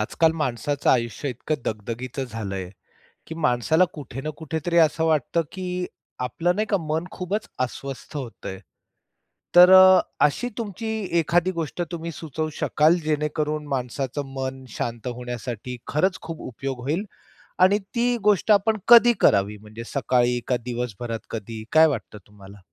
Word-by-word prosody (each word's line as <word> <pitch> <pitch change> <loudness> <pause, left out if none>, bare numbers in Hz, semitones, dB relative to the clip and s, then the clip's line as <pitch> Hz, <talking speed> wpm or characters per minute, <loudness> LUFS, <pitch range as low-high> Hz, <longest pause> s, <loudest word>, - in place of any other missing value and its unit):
आजकाल 160 +9 +2
माणसाचं 145 -1 0
आयुष्य 120 +3 0
इतकं 125 +5 -3
दगदगीचं 115 +5 -4
झालंय, 100 -6 -5 0.6
की 160 - -7
माणसाला 125 +8 +3
कुठे 135 -4 -7
ना 155 - -3
कुठेतरी 160 +2 -3
असं 160 0 +3
वाटतं, 160 +1 +1
की 180 -1 -3 0.3
आपलं 170 +8 0
नाही 215 +1 0
का 200 - +4
मन 155 +2 -1
खूपच 195 +4 -4 0.2
अस्वस्थ 135 +4 -8
होतंय. 120 -8 -6 1.0
तर 180 +1 +10
अ, 185 -1 +9 0.2
अशी 150 +12 +1
तुमची 220 0 -4 0.3
एखादी 175 +2 +2
गोष्ट 170 0 -3
तुम्ही 170 0 -5
सुचवू 155 0 -4
शकाल, 155 +3 +4
जेणेकरून 150 0 -1
माणसाचं 135 +1 -3
मन 130 0 -4
शांत 120 +1 -4
होण्यासाठी 125 0 -5
खरंच 180 +6 +1
खूप 165 -1 -7
उपयोग 130 +1 -5
होईल? 155 - -1 0.6
आणि 190 +3 +5 0.2
ती 240 +1 +2
गोष्ट 210 0 +3
आपण 215 +2 +4
कधी 240 0 +8
करावी? 100 +2 +3
म्हणजे 110 +2 -10
सकाळी 125 -3 +2
का 125 - +2
दिवसभरात 120 -2 -4
कधी? 110 0 -6
काय 160 +1 +7
वाटतं 125 -7 -4
तुम्हाला? 100 -1 -14
145 Hz, 140 wpm, -24 LUFS, 120-170 Hz, 1.0 s, तर